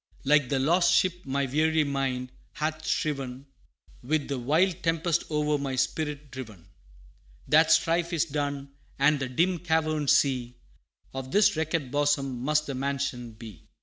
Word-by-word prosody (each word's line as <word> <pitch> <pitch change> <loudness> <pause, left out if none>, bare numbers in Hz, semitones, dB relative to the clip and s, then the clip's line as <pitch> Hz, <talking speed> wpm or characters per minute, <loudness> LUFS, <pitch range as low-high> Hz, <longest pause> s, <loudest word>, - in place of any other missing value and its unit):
Like 145 -2 +3
the 135 - +1
lost 170 +7 +3
ship 180 -4 0
my 140 +1 0
weary 155 +4 +2
mind 135 -3 -2 0.2
hath 155 +1 -3
striven 135 -3 -2 0.6
With 145 +3 -1
the 140 -2 -2
wild 160 +8 +1
tempest 165 0 0
o'er 150 -1 0
my 135 -2 -3
spirit 145 +1 -2
driven; 110 -9 -10 0.8
That - - +5
strife 170 +1 +2
is 170 -1 +1
done 140 -2 -3 0.3
and 140 +1 +3
the 135 -1 -3
dim 170 +7 +1
caverned 155 -3 0
sea 125 -3 +2 0.6
Of 135 -1 -6
this 205 -3 +4
wrecked 160 -4 -2
bosom 145 -3 0
must 150 +3 +1
the 140 - -4
mansion 130 -3 -3
be. 110 -7 -12
145 Hz, 150 wpm, -27 LUFS, 130-155 Hz, 0.8 s, That